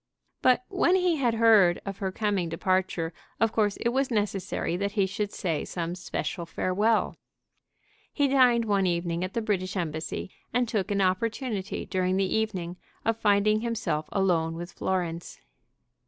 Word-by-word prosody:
But 255 0 +4
when 370 -1 +2
he 360 -3 +2
had 240 -5 +1
heard 215 -6 +5
of 195 -1 -5
her 190 -1 -2
coming 200 -4 -1
departure 180 -1 0 0.3
of 225 +1 +3
course 210 -3 +1
it 235 - 0
was 265 +2 0
necessary 200 -6 -1
that 200 +2 -2
he 200 -3 +2
should 205 +2 -3
say 165 -5 -2
some 170 -1 -4
special 175 -1 -4
farewell. 205 +6 +1 0.9
He 285 -1 +2
dined 250 -4 +4
one 200 -3 +2
evening 170 0 -1
at 185 - -5
the 230 - 0
British 190 -3 -1
Embassy, 160 +1 -3 0.2
and 245 +1 +1
took 210 -3 -1
an 200 -1 +1
opportunity 205 +2 -1
during 185 0 0
the 195 - +2
evening 185 -5 -2 0.3
of 225 - +2
finding 215 0 +3
himself 225 -10 -2
alone 170 -4 +1
with 175 +2 -6
Florence. 175 -3 -3
195 Hz, 155 wpm, -27 LUFS, 180-225 Hz, 0.9 s, heard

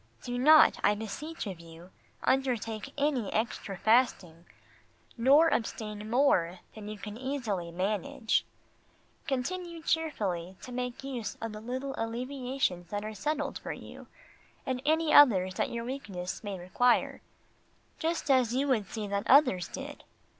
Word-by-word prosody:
Do 245 0 -3
not, 305 +4 +7
I 210 - +4
beseech 255 +10 -6
of 190 -5 -6
you, 170 +2 -13 0.3
undertake 245 -2 0
any 280 -7 0
extra 215 -3 -2
fasting 190 -7 +2 0.7
nor 280 +7 +5
abstain 215 -2 -3
more 205 -9 +3 0.2
than 210 -2 -9
you 215 0 -6
can 210 +1 -8
easily 235 -10 -3
manage. 200 +4 0 0.8
Continue 335 +5 -3
cheerfully 195 - -1
to 255 - -8
make 250 +1 -4
use 245 -6 -5
of 225 - -4
the 215 0 -8
little 260 +4 -4
alleviations 245 -5 -2
that 205 0 -3
are 215 - -5
settled 290 +6 -2
for - - -5
you, - - -11 0.6
and 255 -2 -2
any 320 0 +2
others 190 -10 +7
that - - -1
your 235 0 -4
weakness 205 -10 -5
may 200 -2 -4
require, 210 +8 +1 0.8
just 325 -3 0
as 250 -3 +3
you 275 +2 +1
would 220 -7 +1
see 215 0 -5
that 200 0 -2
others 245 - +5
did. - - -8
230 Hz, 140 wpm, -30 LUFS, 200-270 Hz, 0.8 s, not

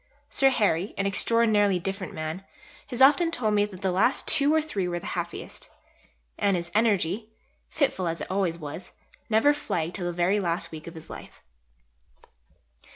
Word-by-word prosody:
Sir 270 - +4
Harry, 205 -7 0
an 200 - 0
extraordinarily 205 -1 +3
different 190 +1 -4
man, 155 +4 -5 0.4
has 250 +1 +2
often 315 +5 +5
told 230 -9 0
me 205 0 +3
that 190 -3 -11
the 190 -2 0
last 210 +8 +1
two 290 -1 +4
or 315 - +4
three 210 -13 -2
were 175 0 -2
the 175 - -8
happiest. - - -6 0.7
And 200 -2 +2
his 170 0 -5
energy, 215 -1 +1 0.4
fitful 225 - 0
as 165 0 -2
it - - -6
always 185 -4 0
was, 150 +2 -8 0.4
never 225 +7 +4
flagged 180 - -3
till 175 -1 -3
the - - -1
very 175 +4 +1
last 175 -1 -2
week 155 0 -9
of 170 - -9
his 160 - -10
life. - - -11
195 Hz, 170 wpm, -26 LUFS, 175-225 Hz, 0.7 s, often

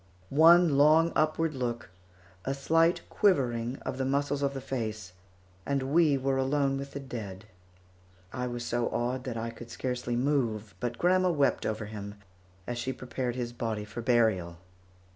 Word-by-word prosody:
One 160 0 +6
long 160 +3 +5
upward 155 +1 +1
look, 120 -6 -4 0.5
a 135 - -2
slight 165 +5 +2
quivering 125 - +1
of 130 - -4
the - - +1
muscles 140 +1 0
of 140 -1 0
the - - -3
face, 110 -7 -4 0.5
and 135 +2 -1
we 155 -4 +4
were 135 0 0
alone 135 0 +1
with 140 0 -7
the 140 - -4
dead. 110 -7 -7 0.9
I 125 -1 -2
was 120 -1 -4
so 120 0 0
awed 125 +2 -2
that 120 -3 -4
I 115 +1 -3
could 115 0 -11
scarcely 125 0 -3
move, 120 -6 0
but 120 -1 -3
grandma 185 +1 +3
wept 145 -5 +1
over 110 0 -3
him, 105 -1 -7 0.5
as 120 0 -4
she 130 +2 -2
prepared 125 -1 -4
his 120 -1 -4
body 110 -3 -3
for 110 +3 -7
burial. 110 -8 +2
130 Hz, 160 wpm, -29 LUFS, 115-140 Hz, 0.9 s, One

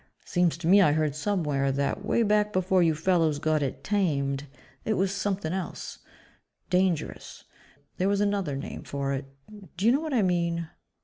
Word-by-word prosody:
Seems 175 -3 +1
to 170 - -7
me 200 +3 +7
I 150 -6 +5
heard 155 -2 +1
somewhere 150 -5 0
that, 140 +1 -1
way 235 - +2
back 210 0 +2
before 185 -1 +2
you 165 -2 +3
fellows 165 -2 +2
got 155 +1 +1
it 135 -1 -3
'tamed' 145 -8 0 0.4
it 215 - 0
was 190 0 +1
something 195 -4 -2
else 190 -1 -5 0.7
dangerous. 180 -4 -1 0.5
There 185 +2 +1
was 200 0 +1
another 200 -8 0
name 135 - -6
for 140 -1 -3
it. 135 0 -3 0.5
Do 190 - -1
you 230 - +6
know 275 +4 +2
what 310 -4 -2
I 225 - +3
mean?" 170 -2 0
175 Hz, 175 wpm, -27 LUFS, 150-200 Hz, 0.7 s, me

